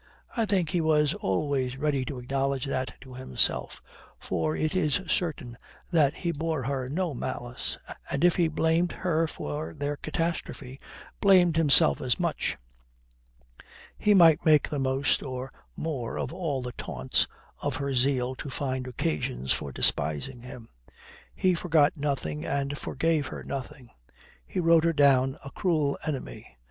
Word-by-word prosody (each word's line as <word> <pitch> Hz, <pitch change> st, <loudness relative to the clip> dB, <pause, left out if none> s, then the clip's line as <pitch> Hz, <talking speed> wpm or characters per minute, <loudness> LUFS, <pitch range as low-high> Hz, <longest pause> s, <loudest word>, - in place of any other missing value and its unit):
I 230 Hz, -2 st, +1 dB
think 185 Hz, -6 st, +1 dB
he 170 Hz, +1 st, +1 dB
was 150 Hz, -2 st, +3 dB
always 130 Hz, +6 st, -1 dB
ready 145 Hz, -2 st, 0 dB
to 140 Hz, -2 st, -5 dB
acknowledge 135 Hz, +2 st, -1 dB
that 130 Hz, -1 st, -3 dB
to 130 Hz, -1 st, -12 dB
himself, 125 Hz, -, -1 dB, 0.3 s
for 80 Hz, -4 st, -2 dB
it 155 Hz, -, -1 dB
is 150 Hz, -5 st, +2 dB
certain 145 Hz, -9 st, -2 dB, 0.3 s
that 150 Hz, -5 st, +3 dB
he 170 Hz, -, -2 dB
bore 160 Hz, -2 st, -2 dB
her 130 Hz, 0 st, -2 dB
no 170 Hz, +2 st, -1 dB
malice, 120 Hz, 0 st, -4 dB, 0.3 s
and 140 Hz, +3 st, -1 dB
if 175 Hz, -1 st, +5 dB
he 170 Hz, -2 st, +4 dB
blamed 160 Hz, +2 st, +1 dB
her 165 Hz, -3 st, 0 dB
for 150 Hz, 0 st, -5 dB
their 145 Hz, 0 st, -2 dB
catastrophe, 155 Hz, -5 st, -4 dB, 0.4 s
blamed 180 Hz, -4 st, +5 dB
himself 140 Hz, -, +5 dB
as -, -, 0 dB
much. -, -, -1 dB, 1.4 s
He 210 Hz, -1 st, +3 dB
might 165 Hz, -3 st, +6 dB
make 155 Hz, -3 st, +5 dB
the 145 Hz, -, -2 dB
most 135 Hz, +1 st, +1 dB
or 130 Hz, -1 st, -5 dB, 0.2 s
more 140 Hz, -8 st, -3 dB
of -, -, -3 dB
all 155 Hz, -8 st, -2 dB
the 125 Hz, -, -4 dB
taunts, 65 Hz, -, -1 dB, 0.3 s
of -, -, -1 dB
her 140 Hz, -1 st, -2 dB
zeal 130 Hz, 0 st, +1 dB
to 145 Hz, -, -6 dB
find 130 Hz, -1 st, -3 dB
occasions 75 Hz, -, -1 dB
for 70 Hz, -, -3 dB
despising 80 Hz, -, 0 dB
him. 125 Hz, -2 st, -10 dB, 0.7 s
He 185 Hz, -1 st, +3 dB
forgot 165 Hz, -4 st, +3 dB
nothing 135 Hz, -, -2 dB
and 140 Hz, 0 st, -1 dB
forgave 150 Hz, +1 st, 0 dB
her -, -, -7 dB
nothing; 135 Hz, -2 st, -7 dB, 0.6 s
he -, -, -3 dB
wrote 165 Hz, -2 st, +5 dB
her 170 Hz, 0 st, +2 dB
down 135 Hz, -3 st, +4 dB
a 140 Hz, -, -7 dB
cruel 155 Hz, -6 st, +1 dB
enemy. 135 Hz, -, -6 dB
140 Hz, 150 wpm, -27 LUFS, 130-160 Hz, 1.4 s, might